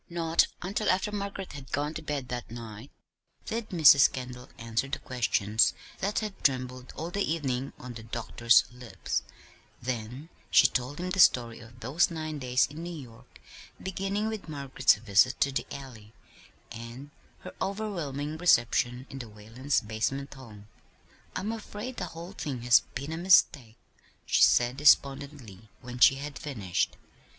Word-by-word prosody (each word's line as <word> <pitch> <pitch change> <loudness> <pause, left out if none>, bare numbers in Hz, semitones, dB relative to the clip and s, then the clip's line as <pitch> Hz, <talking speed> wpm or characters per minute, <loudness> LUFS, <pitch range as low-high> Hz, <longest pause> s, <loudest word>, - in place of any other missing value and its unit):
Not 165 -1 +2 0.2
until 200 +4 -1
after 190 +3 +1
Margaret 200 -3 -5
had 140 -2 -10
gone 145 +2 -1
to 165 - -6
bed 145 -5 -4
that 120 -1 -5
night 115 +1 -9 0.6
did 225 0 -4
Mrs. 150 -6 +7
Kendall 125 -1 -7
answer 115 +2 -2
the 150 +3 -3
questions 115 -4 +1 0.2
that 200 +2 -1
had 210 -2 -6
trembled 130 -1 -1
all 165 +2 -5
the 200 - -2
evening 135 -4 -2
on 125 -1 -9
the 115 - -9
doctor's 115 +1 +3
lips; 115 -6 -4 0.6
then 125 +5 -5 0.2
she - - +6
told 130 +3 0
him 180 +1 -3
the 190 - -2
story 120 -8 +4
of 120 +1 -15
those 145 +9 +2
nine 155 -2 -5
days 125 -2 +2
in 150 +3 -9
New 175 0 -6
York, 125 -2 -14 0.4
beginning 195 +3 -2
with 220 -6 -5
Margaret's 135 -5 +2
visit 105 +4 +2
to 140 - +3
the 135 - -3
Alley, 115 -6 -10 0.6
and 120 +5 -9 0.3
her - - -9
overwhelming 170 -8 -3
"reception" 125 -5 +2
in 135 - -7
the 120 - -7
Whalens' 115 +7 -2
basement 110 +5 -3
home. 110 -6 -13 0.7
"I'm 195 +4 -2
afraid 225 +2 -7
the 180 - -2
whole 170 +3 -7
thing 140 -10 -5
has 120 -2 +7 0.2
been 140 +3 -4
a 160 - -3
mistake," 150 -10 +3 0.5
she - - +2
said 120 +2 +4
despondently, 140 -7 +2
when 125 0 -8
she 135 - +7
had 140 +1 -7
finished. 105 - -2
135 Hz, 155 wpm, -28 LUFS, 120-165 Hz, 0.7 s, Mrs